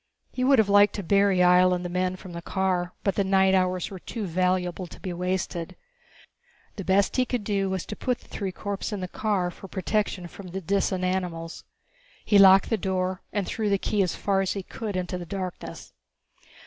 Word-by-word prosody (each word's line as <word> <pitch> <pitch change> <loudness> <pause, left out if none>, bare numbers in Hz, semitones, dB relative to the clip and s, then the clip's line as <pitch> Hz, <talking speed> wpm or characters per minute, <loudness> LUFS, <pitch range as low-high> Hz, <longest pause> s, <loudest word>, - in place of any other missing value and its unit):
He 255 - -2
would 270 +1 +5
have 220 -3 +4
liked 205 +1 +5
to 200 - -4
bury 195 0 +3
Ihjel 180 0 +5
and 180 0 -5
the - - 0
men 180 +1 -1
from 185 -1 -11
the 170 - -6
car, 180 -1 -1
but 195 - +1
the 200 - +1
night 190 0 +3
hours 185 -1 +1
were 190 - -7
too 220 +3 -5
valuable 180 0 0
to - - -13
be 185 - -5
wasted. 180 -1 -3 1.0
The 195 - -4
best 195 +5 +2
he 255 - +4
could 245 -3 -2
do 200 -2 0
was 190 -2 -2
put 245 +4 -2
the - - -21
three 195 -3 -4
corpses 200 +3 -4
in 200 - -3
the 185 - -3
car, 190 -2 -1
for 195 - -11
protection 190 0 -1
from 190 +2 -11
the 190 +2 -5
Disan 190 0 0
animals. 180 -3 -3 0.6
He 205 - +5
locked 195 +2 +7
the 225 - +3
door 185 -1 -2
and 205 -2 -1
threw 215 +2 -2
the 200 - +3
key 205 +1 0
as 180 -3 0
far 195 -1 +1
as 190 - 0
he 195 - -4
could 210 +1 -6
into 180 0 -3
the 175 - -8
blackness. 185 -1 -6
190 Hz, 210 wpm, -26 LUFS, 180-200 Hz, 1.0 s, locked